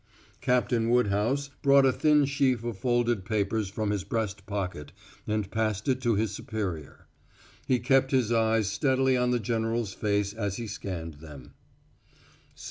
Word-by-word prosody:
Captain 120 -2 +1
Woodhouse 125 +4 +1
brought 140 0 +5
a 130 - +5
thin 150 +1 +3
sheaf 135 -4 +1
of 120 -2 -3
folded 120 -3 +1
papers 105 0 -1
from 105 +1 -2
his 100 -3 -2
breast 100 -1 -3
pocket 90 -8 -4 0.4
and 105 -2 -2
passed 110 -2 -1
it 130 -1 +1
to 120 -3 +2
his 105 0 0
superior. 100 -8 -5 0.6
He 130 - +3
kept 135 +2 +2
his 130 -4 +1
eyes 110 -2 +2
steadily 130 +5 +2
on 125 0 +1
the 125 -1 +1
general's 115 -2 -1
face 100 -1 -1
as 105 -3 -3
he 120 - -4
scanned 85 -7 -6
them. 75 -5 -12
110 Hz, 150 wpm, -28 LUFS, 100-125 Hz, 0.6 s, brought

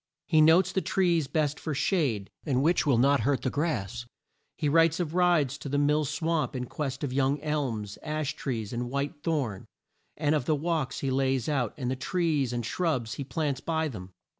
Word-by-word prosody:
He 155 -2 +4
notes 160 +4 +5
the 190 - 0
trees 170 -7 +1
best 150 0 0
for 155 -3 -3
shade 130 - 0
and 135 -3 +1
which 170 0 +2
will 135 -5 +4
not 140 +3 +4
hurt 135 +4 0
the 130 - 0
grass. 120 - -2 0.5
He 150 - 0
writes 165 +2 +4
of 165 -3 -2
rides 170 -6 +2
to 140 - -6
the 145 - 0
Mill 150 +1 +2
Swamp 155 0 -1
in 125 -1 -2
quest 135 +1 -4
of 135 -3 -2
young 135 +2 +1
elms, 130 -10 -2
ash 155 -2 -2
trees, 115 -6 -4
and 120 +1 -3
white 140 +2 -3
thorn, 145 - -2 0.5
and 150 -1 +1
of 150 -5 0
the 155 - +2
walks 160 -2 -2
he 135 - -1
lays 130 -2 +1
out 135 -7 0
and 125 -3 -2
the - - 0
trees 150 -3 0
and 120 -2 -2
shrubs 130 -6 -1
he 140 - -4
plants 145 -1 -2
by 160 -1 0
them. 100 -10 -7
145 Hz, 200 wpm, -28 LUFS, 130-160 Hz, 0.5 s, notes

